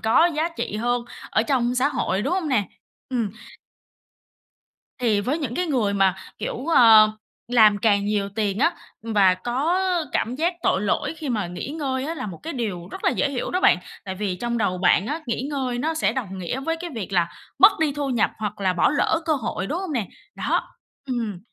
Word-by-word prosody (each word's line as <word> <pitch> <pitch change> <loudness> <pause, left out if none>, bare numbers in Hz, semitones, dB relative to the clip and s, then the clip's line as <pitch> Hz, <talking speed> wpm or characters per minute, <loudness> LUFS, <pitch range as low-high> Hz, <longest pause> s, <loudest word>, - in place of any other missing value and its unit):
có 225 +10 +4
giá 320 +2 +1
trị 210 - -3
hơn 240 +2 0 0.3
ở 220 - +2
trong 245 0 +1
xã 255 +3 +2
hội, 205 -8 -1
đúng 275 +8 -1
hông 365 -5 -1
nè? 215 -8 +1 0.4
Ừm. 235 -5 -1 1.7
Thì 225 -5 +2
với 260 +9 -1
những 265 -7 -3
cái 360 - -1
người 245 -10 +1
mà, 195 -2 +3 0.2
kiểu, 255 - -4
ờ, 225 -9 +7 0.4
làm 215 -4 +6
càng 200 -2 +2
nhiều 205 -1 0
tiền 205 -1 -2
á, 330 +7 +3 0.3
và 205 -5 +4
có 260 - -1 0.4
cảm 235 +3 0
giác 335 +6 0
tội 190 - +2
lỗi 210 +9 0
khi 305 -3 -5
mà 210 -6 -1
nghỉ 175 +7 -6
ngơi 275 -3 -2
á 320 +3 -3
là 260 -7 -5
một 180 -5 -7
cái 330 - -5
điều 200 -9 -4
rất - - -8
là - - +4
dễ 285 - 0
hiểu 260 -3 -3
đó 365 - 0
bạn, - - +5 0.3
tại 190 - -4
vì 190 -1 -2
trong 235 +4 -2
đầu 185 -4 0
bạn 185 +2 +3
á, 305 +4 -3
nghỉ 235 0 -2
ngơi 260 -4 -2
nó 315 +6 -1
sẽ 320 - +1
đồng 200 -8 -4
nghĩa 185 +9 -3
với 330 +4 -1
cái 350 -1 -5
việc 205 -4 -5
là 175 -2 +2 0.3
mất 395 +3 +8
đi 310 -2 +2
thu 290 -1 -3
nhập, 235 -4 +2
hoặc 210 -1 -4
là 190 -2 +2
bỏ 180 - +3
lỡ 320 +3 +1
cơ 325 - +1
hội, 210 -7 -3
đúng 315 - -2
hông 375 -4 -4
nè? 235 -8 -1 0.3
Đó. - - -1 0.4
Ừm. 230 -7 -3
240 Hz, 215 wpm, -23 LUFS, 205-285 Hz, 1.7 s, mất